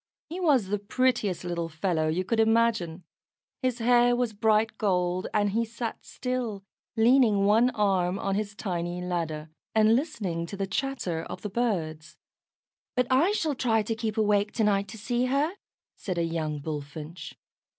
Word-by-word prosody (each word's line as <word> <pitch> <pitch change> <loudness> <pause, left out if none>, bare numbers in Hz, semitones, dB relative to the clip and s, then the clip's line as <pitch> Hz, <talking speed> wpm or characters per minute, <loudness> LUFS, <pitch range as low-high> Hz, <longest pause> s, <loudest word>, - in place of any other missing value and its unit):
He 345 +4 -5
was 275 - +3
the 205 0 0
prettiest 205 -4 0
little 170 -1 -3
fellow 160 -1 0
you 165 +4 0
could 230 +3 0
imagine. 225 -7 +2 0.6
His 255 -2 0
hair 245 0 +4
was 240 -2 -1
bright 220 +1 +2
gold, 180 -2 +1
and 205 -1 +1
he 230 +3 +1
sat 230 0 -5
still, 250 -6 -3 0.3
leaning 225 -3 +5
one 225 +5 +5
arm 190 -3 +1
on 195 0 -1
his 205 0 -2
tiny 175 -4 -3
ladder, 165 -4 -3 0.2
and 220 +1 +5
listening 200 - -2
to 200 - -7
the 195 - -1
chatter 205 -6 -2
of - - -8
the 210 - -4
birds. 165 -9 -2 0.8
"But 250 - +2
I 295 +10 +4
shall 320 -8 0
try 225 -4 +1
to 225 - -2
keep 225 -1 -3
awake 210 -1 +2
to 225 - 0
night 200 -1 +2
to 220 - -9
see 240 +3 0
her," 280 +5 +1 0.4
said 185 -3 -4
a 170 - +1
young 160 -2 -2
Bullfinch. 155 +2 -6
210 Hz, 165 wpm, -27 LUFS, 175-235 Hz, 0.8 s, leaning